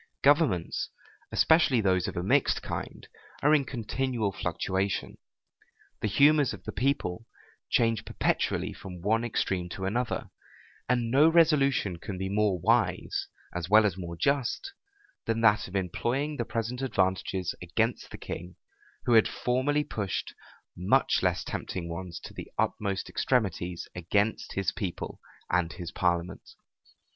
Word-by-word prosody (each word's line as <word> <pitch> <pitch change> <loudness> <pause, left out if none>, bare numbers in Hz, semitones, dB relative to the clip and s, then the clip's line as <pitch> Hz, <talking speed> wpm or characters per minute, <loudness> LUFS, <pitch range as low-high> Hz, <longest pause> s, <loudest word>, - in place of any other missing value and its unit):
Governments, 140 - +3 0.4
especially 160 -6 +4
those 95 -4 +2
of - - -5
a 90 - -1
mixed 95 - +2
kind, - - -5 0.4
are 150 +2 +5
in 150 -2 +4
continual 120 -3 -2
fluctuation: 95 +2 -2 0.8
the - - +1
humors 145 +5 +4
of - - -16
the - - -5
people 115 -6 -1 0.4
change 115 -2 +2
perpetually - - 0
from 90 -2 -9
one 110 +3 +2
extreme 95 -6 -1
to 95 +2 -5
another: 120 +5 -2 0.6
and 120 -2 +1
no 145 +5 +6
resolution 140 - +3
can 95 +2 -6
be 95 +1 -3
more 105 -1 +2
wise, 115 +6 +1 0.3
as 85 -1 -4
well 110 +1 +7
as 100 -5 +1
more 85 -2 -6
just, 140 - 0 0.5
than 115 0 0
that 105 -2 +4
of 95 - -9
employing 120 - -1
the 120 - -1
present 120 +3 -3
advantages 95 -6 0
against 110 +7 -1
the - - -8
king, 90 +1 -7 0.5
who 120 - +3
had 110 -1 +6
formerly 135 +4 0
pushed 100 -9 -3 0.4
much 90 +2 +2
less - - +1
tempting 85 -3 -4
ones 85 0 -6
to - - -10
the - - -9
utmost 100 -2 -1
extremities 90 -8 -1
against, 100 +5 0
his 100 -1 0
people 95 -7 -5 0.3
and 85 -3 +1
his 85 +2 -7
parliament. 90 0 -1
105 Hz, 140 wpm, -28 LUFS, 90-125 Hz, 0.8 s, well